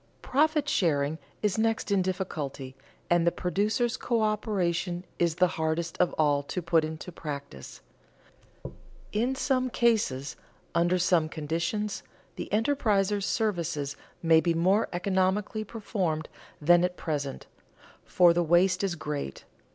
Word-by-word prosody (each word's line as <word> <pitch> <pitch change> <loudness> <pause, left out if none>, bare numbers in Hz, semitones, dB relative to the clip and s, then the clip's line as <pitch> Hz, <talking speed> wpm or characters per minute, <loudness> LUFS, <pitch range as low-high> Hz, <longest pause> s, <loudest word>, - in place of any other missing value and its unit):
Profit 300 +2 +2
sharing 155 - +1 0.2
is 210 0 +1
next 225 -1 0
in 200 -2 +3
difficulty, 150 -8 -4 0.3
and 170 0 +2
producers' 210 +6 0
coöperation 200 -6 0 0.2
is 170 -2 +2
the 180 - +4
hardest 165 -1 -2
of 180 - +3
all 145 -2 +2
to 145 +6 -4
put 165 -2 +2
into 160 +3 -6
practice. 140 - -8 1.3
In 240 +5 0
some 255 -1 0
cases, 210 - +1 0.4
under 175 +2 +2
some 175 -3 +2
conditions, 165 +8 -2 0.3
the - - -6
enterpriser's 210 -4 +1
services 170 -10 -1 0.3
may 165 -1 +5
be 170 -1 +1
more 190 +6 +2
economically 190 +4 0
performed 190 -8 -3 0.3
than 175 +3 +5
at 180 0 -1
present, 145 -4 -3 0.6
for 175 -2 +5
the 175 - +2
waste 180 +3 +3
is 190 -3 0
great. 145 - -5
180 Hz, 120 wpm, -28 LUFS, 160-210 Hz, 1.3 s, may